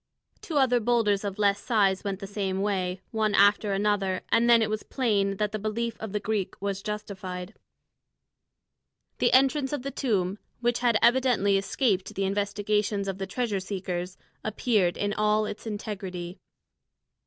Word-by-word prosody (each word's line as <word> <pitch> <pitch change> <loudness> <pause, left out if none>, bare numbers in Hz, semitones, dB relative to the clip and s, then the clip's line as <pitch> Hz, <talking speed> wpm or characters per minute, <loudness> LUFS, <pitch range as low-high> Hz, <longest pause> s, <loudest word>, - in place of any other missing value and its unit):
Two 315 - -3
other 255 -3 +4
boulders 220 -3 +2
of 200 -2 -4
less 205 -1 +2
size 200 -5 +2
went 195 -2 -3
the 200 - -6
same 195 -1 -2
way, 185 -2 -1
one 215 -2 +1
after 205 +1 +4
another, 195 -2 0
and 235 +1 +3
then 230 -1 +6
it - - +1
was 215 0 -2
plain 200 -6 0
that 210 0 0
the 215 - -3
belief 225 +2 -2
of 220 -2 -6
the 210 - -1
Greek 210 -2 -2
was 195 -1 -3
justified. 195 -2 -6 1.7
The - - +3
entrance 270 +1 +4
to 290 - -2
a - - -3
tomb, 200 -7 -1 0.2
which 240 0 +1
had 240 -2 +3
evidently 240 -5 +4
escaped 195 0 0
the 195 - 0
investigations 205 0 0
of 195 0 -3
the 195 - -3
treasure 215 -1 -1
seekers, 185 -2 -4 0.3
appeared 210 -4 +1
in 205 0 -1
all 215 0 +2
its 210 +2 -6
integrity. 195 -4 -5
205 Hz, 160 wpm, -27 LUFS, 195-220 Hz, 1.7 s, then